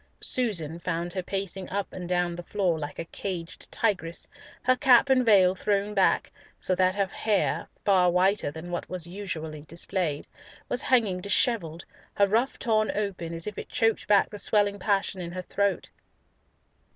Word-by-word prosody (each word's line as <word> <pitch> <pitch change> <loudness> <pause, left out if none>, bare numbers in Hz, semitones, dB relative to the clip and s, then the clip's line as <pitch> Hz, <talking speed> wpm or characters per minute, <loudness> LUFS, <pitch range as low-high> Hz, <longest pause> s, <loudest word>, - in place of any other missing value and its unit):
Susan 170 -10 0
found 170 0 -3
her 190 - -2
pacing 195 0 -4
up 200 +1 -3
and 180 -1 -6
down 175 -1 0
the 175 - -6
floor 175 -2 -1
like 145 -1 -6
a 165 - -4
caged 170 -1 -6
tigress, 180 -7 -1 0.4
her 255 0 +4
cap 255 +1 +5
and 255 -1 +4
veil 195 -5 +5
thrown 200 +2 -1
back, 195 -2 +2 0.3
so 185 - -1
that 185 +1 +2
her 200 -1 +2
hair—far 195 -2 +1
whiter 185 0 +2
than 160 +4 -8
what 175 - -4
was 180 -3 -3
usually 170 -5 -6
displayed—was 165 - -4
hanging 215 -8 +2
dishevelled, 185 -5 +1 0.3
her 200 - +5
ruff 230 +6 +1
torn 215 -2 +1
open, 195 -5 -3
as 165 0 -3
if 210 - -5
it - - -8
choked 225 -1 +1
back 205 -1 +4
the 205 - -5
swelling 205 -1 +1
passion 195 -1 0
in 170 0 -6
her 185 - -4
throat. 200 +1 -1
190 Hz, 165 wpm, -27 LUFS, 175-205 Hz, 0.4 s, cap